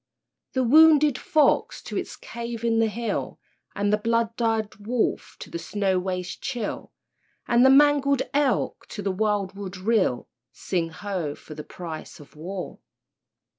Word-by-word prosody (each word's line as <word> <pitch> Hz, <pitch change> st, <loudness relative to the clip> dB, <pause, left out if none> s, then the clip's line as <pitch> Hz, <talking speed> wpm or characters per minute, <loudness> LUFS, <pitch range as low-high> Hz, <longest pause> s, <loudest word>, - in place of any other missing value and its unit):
The 260 Hz, -, +1 dB
wounded 300 Hz, +1 st, +6 dB
fox 310 Hz, -5 st, +2 dB
to -, -, -7 dB
its -, -, -3 dB
cave 235 Hz, -, -7 dB
in 230 Hz, -1 st, +2 dB
the 225 Hz, -, +3 dB
hill, 230 Hz, +2 st, -3 dB, 0.4 s
And 205 Hz, 0 st, +1 dB
the 210 Hz, -, +3 dB
blood 230 Hz, +1 st, 0 dB
dyed 225 Hz, -3 st, -1 dB
wolf 225 Hz, +3 st, -2 dB
to -, -, -9 dB
the 170 Hz, -, -4 dB
snow 195 Hz, 0 st, 0 dB
waste 180 Hz, -1 st, -4 dB
chill, 240 Hz, -6 st, -4 dB, 0.6 s
And 240 Hz, +1 st, +4 dB
the 265 Hz, -, +7 dB
mangled 280 Hz, -1 st, +5 dB
elk 280 Hz, -3 st, 0 dB
to 205 Hz, -, -7 dB
the 195 Hz, -, 0 dB
wild 205 Hz, -1 st, 0 dB
wood 195 Hz, -1 st, -7 dB
rill, 190 Hz, -, +1 dB, 0.2 s
(Sing 170 Hz, -3 st, -2 dB
ho! 180 Hz, -4 st, -4 dB
for 155 Hz, -, -12 dB
the 150 Hz, 0 st, -7 dB
price 165 Hz, -2 st, -8 dB
of 145 Hz, 0 st, -16 dB
war!) 180 Hz, +4 st, -6 dB
215 Hz, 155 wpm, -25 LUFS, 185-245 Hz, 0.6 s, the